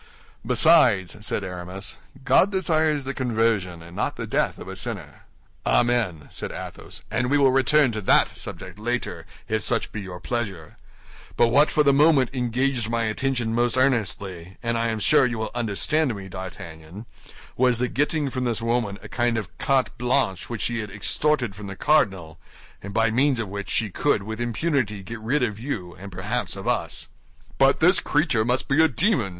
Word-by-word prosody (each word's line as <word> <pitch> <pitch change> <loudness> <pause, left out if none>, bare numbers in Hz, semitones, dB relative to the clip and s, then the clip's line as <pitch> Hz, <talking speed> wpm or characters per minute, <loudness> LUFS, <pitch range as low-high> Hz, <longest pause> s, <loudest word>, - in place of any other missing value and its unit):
"Besides," 120 - +4
said 105 - -1
Aramis, 90 +1 -5 0.3
"God 200 - +4
desires 160 -6 +1
the 135 +1 -4
conversion 110 -9 0
and 85 +1 -13
not - - -1
the - - -4
death - - 0
of - - -10
a - - -6
sinner." - - -4 0.4
"Amen!" 115 -11 +1
said - - -5
Athos, - - -8
"and 125 +2 0
we 145 - +3
will 135 -2 +4
return 135 +1 +4
to 110 -1 -4
that 95 - +3
subject 95 +2 -6
later, 120 +3 -3 0.2
if 110 0 0
such 115 +2 +1
be 105 - -5
your 90 -2 -8
pleasure; 95 -7 -4 0.6
but 120 - +4
what 145 +5 +4
for 150 - +2
the 140 -1 +4
moment 145 -3 +4
engaged 125 -1 -1
my 115 0 0
attention 120 +1 -1
most 120 +2 +1
earnestly, 100 -8 -1
and 115 0 0
I 115 0 0
am 110 -1 -1
sure 135 +5 +4
you 120 -1 -3
will 110 -1 -3
understand 120 +4 0
me, 95 -1 -8
D'Artagnan, 95 0 -9 0.5
was 125 -1 +3
the 125 +1 0
getting 145 +1 0
from 130 -1 -3
this 120 -3 0
woman 115 -3 -1
a - - -8
kind 120 +1 0
of 105 -5 -6
carte 135 -2 +1
blanche 120 -7 0
which 115 -4 -4
she 120 -1 -1
had 105 -2 -5
extorted 120 +4 0
from 100 +1 -9
the 100 - -7
cardinal, 95 - +1 0.4
and 100 - -7
by 115 +2 +2
means 130 +2 +2
of 110 -4 -3
which 100 0 -6
she 110 -3 0
could 105 +1 +1
with 110 +3 -5
impunity 120 -4 -1
get 115 +4 -7
rid 125 +6 0
of 110 -3 -2
you 110 -9 -5
and 100 +2 -10
perhaps 95 +1 -3
of - - -7
us." - - -1 0.5
"But 135 0 +4
this 180 +3 +6
creature 145 -7 +1
must 125 +3 0
be 145 +3 +4
a - - +6
demon!" 160 - +1
115 Hz, 185 wpm, -24 LUFS, 100-135 Hz, 0.6 s, this